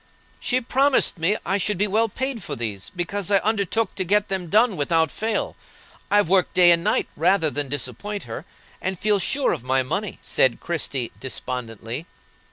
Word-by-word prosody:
"She 255 -1 +1
promised 265 -5 +2
me 190 +6 +2
I 195 +1 +1
should 205 +1 0
be 205 - +2
well 220 +3 +1
paid 260 +1 -3
for 150 -5 -5
these, 105 -5 -5
because 190 +2 -2
I 200 - +5
undertook 215 0 0
to 190 - -2
get 205 +3 +1
them 190 -2 -2
done 220 +3 +4
without 160 0 +1
fail. 220 0 -2 0.5
I've 205 -3 +4
worked 185 +1 +2
day 180 -1 +7
and 170 0 +3
night - - +1
rather 165 0 +2
than 145 -1 -2
disappoint 145 - -4
her, - - -7 0.4
and 185 0 -2
felt 205 +1 +1
sure 270 +8 +1
of - - -4
my 130 +1 +2
money," 195 +10 -3
said 130 - +2
Christie, 140 -7 -2
despondently. 125 - -5
185 Hz, 175 wpm, -23 LUFS, 145-210 Hz, 0.5 s, day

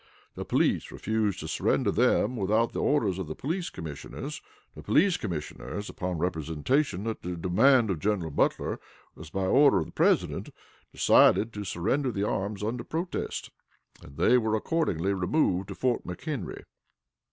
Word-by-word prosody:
The - - -6
police - - +1
refused 110 -3 -1
to - - -6
surrender - - +1
them 125 +5 +2
without 110 +2 +1
the - - -2
orders 105 -11 +1
of 95 - -4
the 80 - -5
police 170 +5 -3
commissioners. 75 -4 -7 0.3
The - - -10
police 185 +2 +3
commissioners, 85 - -5
upon 90 -1 -3
representation 90 - -1
that 110 0 -4
the 90 0 -5
demand 110 +7 +4
of 85 - -2
General 95 -4 -1
Butler - - 0 0.3
was 80 -1 -11
by 95 +2 -2
order 140 +8 +5
of - - 0
the - - -12
President, - - +1 0.4
decided 110 +1 +4
to 105 - -5
surrender 110 +9 -1
the 100 -2 -2
arms 100 +1 -2
under 120 +3 -2
protest, 170 +3 -4 0.5
and 70 - -14
they 120 +9 +5
were 110 -1 0
accordingly 100 - 0
removed 95 - +1
to - - -7
Fort 125 -2 0
McHenry. 120 - -5
105 Hz, 155 wpm, -28 LUFS, 90-125 Hz, 0.5 s, order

